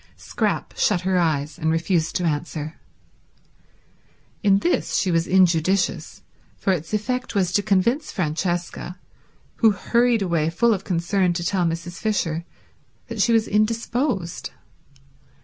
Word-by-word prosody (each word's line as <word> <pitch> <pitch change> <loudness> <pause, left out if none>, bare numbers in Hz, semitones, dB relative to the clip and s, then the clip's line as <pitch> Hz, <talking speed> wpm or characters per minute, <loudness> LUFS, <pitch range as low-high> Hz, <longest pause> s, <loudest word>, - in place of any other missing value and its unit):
Scrap - - -2
shut 190 -5 +2
her 185 0 +1
eyes 150 -3 -1
and 160 - 0
refused 165 0 0
to 180 - 0
answer. 155 -1 -3 1.6
In 200 -2 +4
this 345 - 0
she 185 - +1
was 165 0 +1
injudicious, 185 0 +2 0.3
for 195 - +1
its 165 -3 -4
effect 240 +3 -2
was 185 -3 +1
to 205 - +2
convince 215 +9 +1
Francesca, 175 +1 -2 0.6
who 225 - +5
hurried 235 +3 +2
away 165 -4 +1
full 230 +8 +2
of 195 -2 -3
concern 180 0 +1
to 170 0 -3
tell 190 -3 +1
Mrs. 170 +1 -4
Fisher, 170 -7 -1 0.6
that - - -2
she 235 - +3
was 225 -1 +3
indisposed. 220 - -1
185 Hz, 130 wpm, -23 LUFS, 170-210 Hz, 1.6 s, who